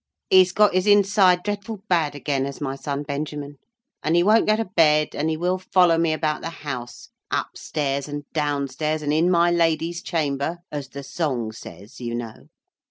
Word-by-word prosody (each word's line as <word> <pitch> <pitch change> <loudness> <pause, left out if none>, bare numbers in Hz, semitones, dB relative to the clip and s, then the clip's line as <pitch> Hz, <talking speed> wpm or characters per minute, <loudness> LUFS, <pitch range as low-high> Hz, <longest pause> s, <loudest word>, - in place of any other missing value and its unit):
"He's 185 -1 +6
got 210 +1 +4
his 185 +2 +1
inside 195 -3 +4
dreadful 205 0 -4
bad 165 -6 +1
again, 140 -1 -1
has 140 0 -6
my 135 -2 -3
son 140 +1 -4
Benjamin. 145 0 -5 0.4
And 160 +2 +1
he 175 - +4
won't 215 +4 +4
go 215 - +4
to 225 +1 -1
bed, 155 -5 +3
and 155 +2 -1
he 160 - -1
will 180 +3 0
follow 180 -3 +3
me 165 -1 +2
about 155 -1 -1
the 165 - -4
house, 130 -7 -7 0.2
up - - -2
stairs 140 -2 -2
and 145 0 -5
downstairs, 150 0 -1
and 145 0 0
in 165 +3 +3
my 175 -1 +4
lady's 170 0 +1
chamber, 150 0 -2
as 145 -2 -5
the 140 0 -8
song 135 -6 -2
says, 110 0 -12
you 120 -1 -3
know. 115 -2 -7
155 Hz, 185 wpm, -23 LUFS, 140-180 Hz, 0.4 s, He's